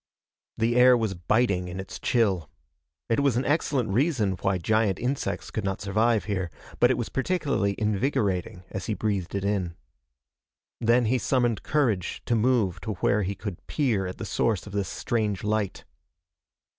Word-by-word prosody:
The 115 +1 +1
air 125 0 +7
was 110 -4 -1
biting 95 +1 +1
in 90 +1 -6
its 95 - -7
chill. 95 - +1 0.6
It 115 - +1
was 140 -4 +2
an 125 - 0
excellent 145 -6 +1
reason 120 - +2
why 95 -1 +1
giant 105 +1 +1
insects 130 +3 -2
could 110 - -3
not 95 -1 -2
survive 110 +3 +1
here, 95 -4 -2 0.3
but 125 - +6
it 130 - +2
was 120 - -3
particularly 135 - 0
invigorating 105 -3 0
as 95 - -5
he 110 - -1
breathed 100 -5 -2
it 100 0 -1
in. 95 -4 -1 1.0
Then 120 +1 +3
he 125 +3 +2
summoned 120 -4 +1
courage 120 - 0
to 120 - +1
move 110 -6 +2
to 110 - -3
where 105 +1 +1
he 100 +1 -2
could 95 -2 -7
peer 115 -11 0
at 90 - -6
the - - -5
source 110 -5 0
of 100 - -10
this 100 -2 -1
strange 105 -5 -1
light. 105 -2 -1
110 Hz, 170 wpm, -26 LUFS, 95-120 Hz, 1.0 s, air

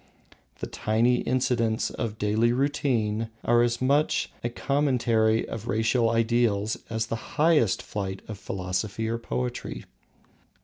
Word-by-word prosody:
The - - -1
tiny 115 +3 +1
incidents 120 -3 0
of 110 -2 -4
daily 110 +3 +2
routine 120 -5 0 0.2
are 120 0 +4
as 120 0 +1
much 140 +4 +1
a 120 - 0
commentary 120 -5 +1
of 110 - -6
racial 115 +2 +2
ideals 115 -2 +1
as 110 0 -1
the 115 0 -7
highest 150 - +3
flight 95 -2 -5
of 105 -3 -7
philosophy 95 +4 -3
or 115 +1 -2
poetry. 60 - -4
115 Hz, 125 wpm, -26 LUFS, 105-120 Hz, 0.2 s, are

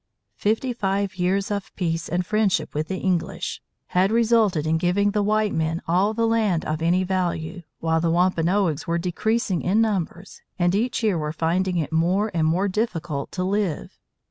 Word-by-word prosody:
Fifty 225 +5 0
five 195 -3 -1
years 190 +3 0
of 200 -1 -3
peace 165 -3 -2
and 175 +2 -1
friendship 205 -6 +1
with 155 +1 -2
the 190 - -3
English 180 -3 -2 0.3
had 185 +3 +2
resulted 225 -8 +3
in 160 +1 +1
giving 200 +4 +2
the 210 0 +1
white 215 +1 +1
men 160 +1 0
all 190 +6 +2
the 230 0 +1
land 220 -7 +1
of 155 +1 -2
any 175 +3 +2
value, 180 -2 -2 0.2
while 160 0 +1
the 170 - +1
Wampanoags 175 -1 +1
were 170 0 +1
decreasing 185 +2 0
in 195 +5 +2
numbers 195 -4 -2 0.2
and 175 -1 +2
each 235 +4 0
year 200 -6 +2
were 150 0 -2
finding 175 +3 0
it 155 -2 -2
more 185 +6 +1
and 160 -2 +1
more 180 +5 +1
difficult 175 -8 -2
to 180 - -2
live. 195 -3 -2
185 Hz, 175 wpm, -23 LUFS, 165-205 Hz, 0.3 s, resulted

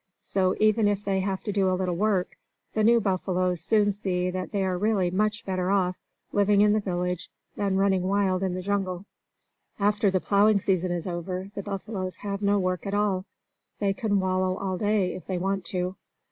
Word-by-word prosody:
So, 185 -1 0
even 215 0 +4
if 205 0 -1
they 195 -1 +1
have 190 0 -2
to 210 - -2
do 195 -2 +2
a 185 - +1
little 180 -2 -1
work, 195 -1 0 0.4
the 215 - +1
new 235 +2 +6
buffaloes 185 -3 0
soon 210 -2 +3
see 180 -2 -1
that 185 0 -4
they 200 -2 0
are 185 -1 0
really 195 -2 +1
much 215 +3 0
better 185 -1 -1
off 185 -2 +2 0.4
living 205 0 +3
in 210 0 +5
the 215 - +3
village 180 -3 -2 0.3
than 195 -2 0
running 195 -1 +3
wild 190 0 +1
in 185 -2 -1
the 185 - -4
jungle. 195 -2 -2 0.7
After 205 +1 +2
the 190 -1 +1
plowing 205 +2 +3
season 185 -2 0
is 175 -2 -2
over, 185 +2 -4
the 200 - -4
buffaloes 195 -1 -4
have 200 0 -4
no 205 0 +3
work 185 -1 -1
at 200 - -1
all. 200 -2 +1 0.5
They 200 -1 +1
can 205 0 0
wallow 185 0 0
all 190 -1 -2
day, 205 -3 +1
if 185 - -9
they 185 - -1
want 195 +1 -1
to. 180 0 -2
195 Hz, 200 wpm, -26 LUFS, 185-205 Hz, 0.7 s, new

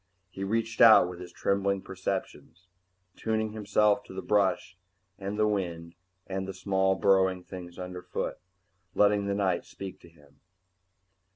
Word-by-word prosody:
He 95 - -6
reached 115 +3 -1
out 110 -5 +9
with 90 -1 -8
his 90 -1 -9
trembling 100 0 0
perceptions, 95 -1 -5 0.5
tuning 110 -1 -1
himself 105 -1 +2
to - - -11
the 95 - -5
brush 100 -2 +1 0.4
and 100 +2 -4
the 110 0 +3
wind 85 -5 -3 0.3
and 95 0 -4
the 95 - -6
small 95 0 +1
burrowing 95 -1 +3
things 90 -2 -9
underfoot, 90 0 -5 0.6
letting 100 -1 +3
the 100 - 0
night 95 -3 0
speak 95 -1 -9
to 85 - -16
him. 75 -4 -23
95 Hz, 145 wpm, -28 LUFS, 90-100 Hz, 0.6 s, out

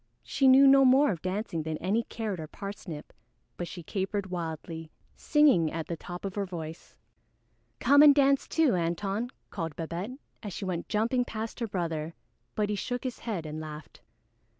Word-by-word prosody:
She 270 - +2
knew 265 +1 +8
no 275 0 +7
more 265 +1 +5
of 170 -5 -4
dancing 185 -3 -2
than 155 0 -3
any 200 +8 +1
Carrot 220 -5 -4
or 155 - -5
Parsnip, 190 -5 -8 0.4
but 175 - -4
she 175 -1 -8
capered 195 +2 -3
wildly, 165 -1 -5 0.3
singing 280 - +4
at 165 -1 -3
the 170 - -4
top 175 +3 -8
of 195 - -3
her 200 -1 -2
voice. 165 -2 -8 0.8
"Come 285 +1 +6
and 295 -2 +9
dance 275 -1 +3
too, 320 -7 +3
Antone," 195 +7 -1 0.2
called 165 -5 -4
Babette, 175 +9 -5 0.2
as 205 -4 -6
she 195 - -5
went 175 -2 -3
jumping 230 +4 +1
past 225 0 -5
her 230 - -1
brother, 165 -4 -3 0.4
but 210 -1 +1
he 210 - 0
shook 245 +4 -3
his 255 -2 -4
head 200 -9 -4
and 155 0 -5
laughed. 155 -1 -9
195 Hz, 175 wpm, -29 LUFS, 165-235 Hz, 0.8 s, and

